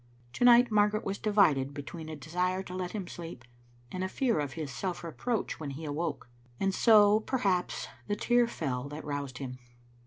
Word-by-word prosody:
To - - -1
night 245 0 +7
Margaret 210 0 +3
was 195 0 -3
divided 155 -11 +3
between 155 +2 -7
a 155 - -5
desire 180 +5 -1
to 180 - -9
let 185 -1 -4
him 200 -4 -4
sleep 165 -9 -8 0.5
and 185 - -3
a 190 - -2
fear 240 - +1
of 145 -3 -3
his 155 -4 -5
self 175 +8 -4
reproach 215 +7 -3
when 150 -3 -5
he 145 +4 -6
awoke; 150 -1 -3 0.3
and 195 0 +1
so, 210 -1 +6
perhaps, 200 -7 -1 0.2
the 205 - 0
tear 240 +2 +3
fell 140 - -3
that 150 +2 -7
roused 145 -3 -4
him. 130 -2 -6
180 Hz, 185 wpm, -30 LUFS, 145-210 Hz, 0.5 s, night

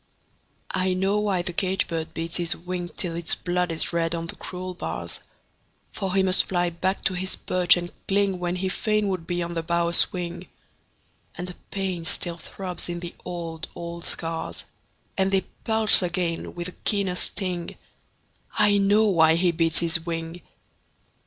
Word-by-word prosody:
I 185 -1 +1
know 195 +3 +1
why 200 -4 0
the 175 -1 -3
caged 185 +1 +1
bird 160 -1 -3
beats 165 0 -2
his 175 +1 +1
wing 175 0 -4
Till 170 -2 -3
its 170 -1 +1
blood 180 -1 -1
is 165 +1 -1
red 170 0 +1
on 165 0 -3
the 165 - -6
cruel 185 0 -6
bars; 85 - -5 0.7
For 190 -1 -3
he 190 - +4
must 185 0 +4
fly 175 -2 0
back 185 +3 -1
to 190 - +2
his 185 +1 -2
perch 180 -1 +4
and 175 0 -5
cling 195 -2 +2
When 175 0 -1
he 185 +1 -1
fain 215 +1 +1
would 180 -3 -3
be 175 -1 -1
on 170 0 -4
the 165 - -1
bough 170 +1 +1
a - - -4
swing; 175 -1 +2 0.9
And 180 +1 -4
a - - -13
pain 185 -4 -3
still 170 +1 +1
throbs 180 0 -3
in 175 0 -3
the 175 0 -7
old, 165 -2 -5
old 170 0 -6
scars 165 0 -1 0.5
And 190 0 +3
they 195 -1 +3
pulse 220 0 +4
again 175 -2 -2
with 175 0 -4
a - - -16
keener 200 -3 +1
sting 180 -1 0 0.8
I 205 -1 +4
know 205 +2 +4
why 160 -5 +5
he 175 +1 +3
beats 165 -1 +1
his 165 -1 +3
wing! 165 0 -4
175 Hz, 180 wpm, -25 LUFS, 170-190 Hz, 0.9 s, why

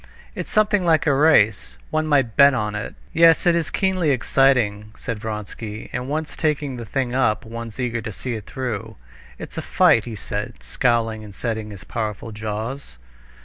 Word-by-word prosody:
"It's - - -5
something 210 -2 +2
like 165 -2 +3
a 145 - +4
race. 115 - +3
One 155 0 0
might 135 -7 +2
bet 140 -1 +7
on 105 -2 -1
it." 105 0 -5 0.2
"Yes, 165 +1 +5
it 175 -1 +5
is 170 -2 0
keenly 185 -4 +1
exciting," 120 -6 +2
said 115 -4 -4
Vronsky. 105 0 -6
"And 125 +2 -3
once 155 +1 -3
taking 145 -4 -1
the 120 - -6
thing 130 +1 -1
up, 115 -5 +1
one's 115 0 -7
eager 120 -2 -1
to 110 0 -5
see 125 +5 -5
it 110 -3 -6
through. 125 -6 -4 0.4
It's - - -7
a - - -3
fight!" 115 - +4
he 115 -2 -6
said, - - -5
scowling 115 - 0
and 105 -2 -11
setting 110 -2 -3
his 100 -4 -10
powerful 110 -1 -4
jaws. 110 - -5
120 Hz, 180 wpm, -22 LUFS, 110-140 Hz, 0.4 s, bet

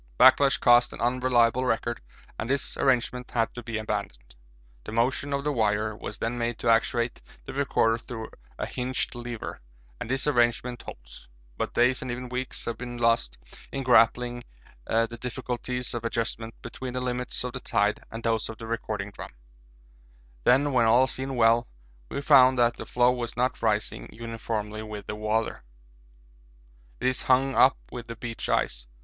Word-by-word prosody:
Backlash 135 +1 +7
caused 120 0 +5
an - - -9
unreliable 125 0 +2
record, 120 -1 -1 0.4
and 115 - -3
this 140 +1 -1
arrangement 125 -2 +1
had 115 -2 0
to 120 - -7
be 115 -1 -4
abandoned. 100 - -4 0.5
The - - -7
motion 125 +5 0
of 140 0 -1
the 150 - 0
wire 110 -3 +1
was - - -7
then 120 +2 -2
made 120 -1 -1
to 120 - -1
actuate 115 +1 +2 0.2
the - - -7
recorder 115 -5 +2
through 115 -1 -7 0.3
a - - -2
hinged 130 +1 -2
lever, 120 - -6 0.4
and - - -6
this 135 +1 0
arrangement 120 -3 +1
holds, - - -11 0.3
but - - -3
days 125 +2 +3
and - - -5
even 125 +1 -4
weeks 125 +1 -4
have 115 -1 -4
been 120 -1 -6
lost 115 - +1 0.3
in 135 - -3
grappling 120 0 +3 0.4
the 115 +1 0
difficulties 125 0 -3
of 120 -1 -4
adjustment 115 -1 -3
between 125 +1 -6
the 125 - -1
limits 125 0 -2
of 125 -1 -4
the - - -4
tide 105 -3 0
and 115 0 -7
those 115 -1 0
of 115 - -7
the 115 - -8
recording 105 -3 -3
drum; - - -8 1.2
then 140 +3 +4
when 120 -3 +4
all 120 +4 +6
seemed 130 +1 -3
well 115 0 +4 0.4
we 140 - -3
found 130 -2 +6
that 120 -1 +3
the - - -8
floe 125 0 +4
was 120 -1 -4
not 125 +1 0
rising 105 -2 -1
uniformly 110 -2 -4
with 105 -2 -7
the - - -4
water. 110 +1 -1 1.4
It - - -4
is 130 0 +1
hung 130 +1 +3
up 130 +1 +5
by 120 - -5
the 115 0 -8
beach 115 0 -5
ice. - - 0
120 Hz, 170 wpm, -27 LUFS, 115-125 Hz, 1.4 s, Backlash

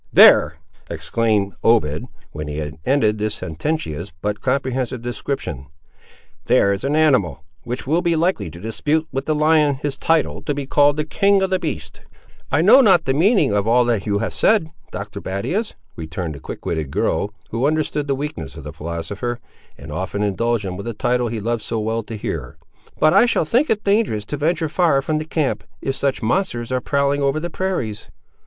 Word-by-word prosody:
There," 75 +2 +7 0.3
exclaimed 105 -4 0
Obed, 90 -11 +2 0.2
when 75 0 -6
he 75 0 -5
had 75 0 -5
ended 110 -6 +2
this 105 0 -1
sententious 85 - -3
but 105 +3 -3
comprehensive 130 -2 -1
description, 120 - -4 0.8
"there 100 - +4
is 100 - -5
an 140 +2 0
animal, 130 - +2 0.2
which 125 +2 -4
will 160 +6 +2
be 170 -1 +1
likely 170 - 0
to 85 - -11
dispute 150 - -1
with 135 +1 -3
the 155 - +2
lion 150 -1 +3
his 140 +1 -4
title 165 -1 +1
to 145 - -2
be 140 -1 -3
called 145 +1 +3
the 150 - -1
king 195 +4 +3
of 190 - -1
the 185 - +2
beasts!" 80 - -5 0.5
"I 145 +4 +3
know 235 +9 +8
not 190 -8 +5
the 130 - +1
meaning 185 - +3
of 105 +1 +1
all 120 0 +4
you 100 0 -1
have 115 +1 -2
said, 195 -8 +2 0.2
Doctor 100 0 -6
Battius," 170 - -2 0.2
returned 80 +1 -5
the 70 - -9
quick - - -9
witted 80 -4 -2
girl, 100 +8 0 0.2
who 115 +5 +1
understood 150 -1 -1
the 135 - +1
weakness 135 - -5
of - - -9
the - - -8
philosopher, 85 +9 -4 0.4
and - - -10
often 95 +5 -3
indulged 105 +2 0
him 90 -1 -4
with 100 - -6
a 115 - -4
title 120 +2 +1
he 115 -1 -3
loved 115 +2 -1
so 115 +1 -3
well 110 +1 -1
to 110 0 -7
hear; - - -5 0.4
"but 155 - +5
I 240 - +6
shall 200 - +1
think 245 - +2
it 215 -1 +1
dangerous 200 - +1
to 145 - -4
venture 160 +2 0
far 155 -4 +2
from 155 +1 0
the 155 - -4
camp, 140 -10 -1 0.2
if 135 - -2
such 135 -3 -1
monsters 120 - -1
are 130 0 0
prowling 140 +1 +1
over 140 +2 +1
the 170 +2 -5
prairies." 160 - -3
125 Hz, 195 wpm, -20 LUFS, 105-155 Hz, 0.8 s, know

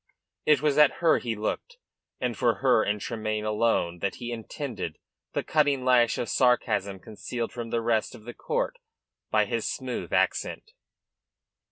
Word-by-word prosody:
It 150 -2 +4
was 150 -1 +3
at 150 -2 +7
her 165 -2 +3
he 115 -2 -3
looked, 110 - -4 0.4
and 125 -2 -1
for 120 0 +2
her 130 -4 +3
and 105 0 0
Tremayne 110 -1 -3
alone 105 -5 +1
that 100 - -1
he 120 -1 -6
intended 115 -2 -5 0.4
the - - -1
cutting 145 -4 +2
lash 120 -2 +4
of 120 - -2
sarcasm 105 -6 +2
concealed 115 +4 -5
from 120 -1 -6
the 115 0 0
rest 115 -2 +1
of 110 - -14
the 120 +2 -8
court - - -2 0.5
by - - +3
his - - -2
smooth - - -4
accent. 440 - 0
120 Hz, 160 wpm, -27 LUFS, 110-130 Hz, 0.5 s, at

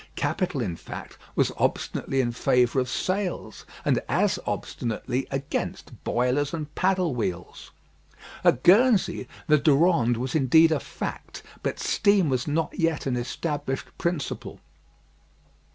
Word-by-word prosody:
Capital, - - -1
in 85 -2 -3
fact, - - -9 0.2
was - - +2
obstinately 135 0 0
in 120 -2 -1
favour 125 +2 +2
of 125 -1 -1
sails, 185 +3 -3 0.2
and - - +2
as - - +2
obstinately 120 +3 -3
against 135 0 -3
boilers 130 +5 0
and 150 -2 -6
paddle 185 -4 +1
wheels. 90 -7 -4 0.7
At 125 - +3
Guernsey, 215 +2 +4 0.2
the 150 -3 +4
Durande 140 -5 +3
was 125 +2 -3
indeed 160 +3 +5
a 155 - +2
fact, - - -7 0.2
but - - -2
steam 200 -6 +3
was 130 +1 -1
not 155 +2 -1
yet 165 -2 +1
an 130 -2 0
established 135 +2 -3
principle. 170 -4 -3
145 Hz, 125 wpm, -26 LUFS, 125-165 Hz, 0.7 s, indeed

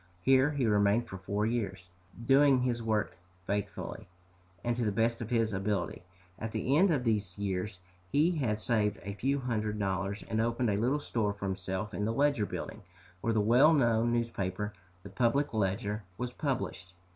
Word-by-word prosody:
Here 135 +1 +5
he 145 -4 0
remained 105 +2 +3
for 95 -4 -7
four 100 +3 -1
years, 100 -5 -2 0.4
doing 135 0 +5
his 120 -2 0
work 110 -4 -1 0.3
faithfully, 100 +1 -4 0.6
and 120 0 0
to 120 - -1
the 105 - +1
best 115 +3 +1
of 115 - -5
his 115 -3 +1
ability. 100 -2 -2 0.4
At 115 0 -5
the 135 - +1
end 190 +6 +5
of 145 -7 +1
these 105 -6 0
years 95 -1 -2 0.3
he 155 +5 +4
had 125 -11 -1
saved 110 -2 +1
a 100 - -4
few 135 +7 0
hundred 110 -4 -1
dollars, 100 0 -2
and 110 0 0
opened 115 0 +1
a - - +1
little 125 +7 +1
store 110 -7 -1
for 100 -1 -6
himself 95 +2 -3
in 105 - -1
the 110 - 0
Ledger 140 -6 +2
Building, 110 - -6 0.4
where 115 - 0
the 110 -1 +2
well 125 +9 +6
known 120 -3 +3
newspaper, 105 -4 -2 0.3
the 100 - -9
"Public 130 +4 +1
Ledger," 105 +1 -1 0.2
was 125 +1 -4
published. 125 - -3
110 Hz, 180 wpm, -31 LUFS, 100-125 Hz, 0.6 s, well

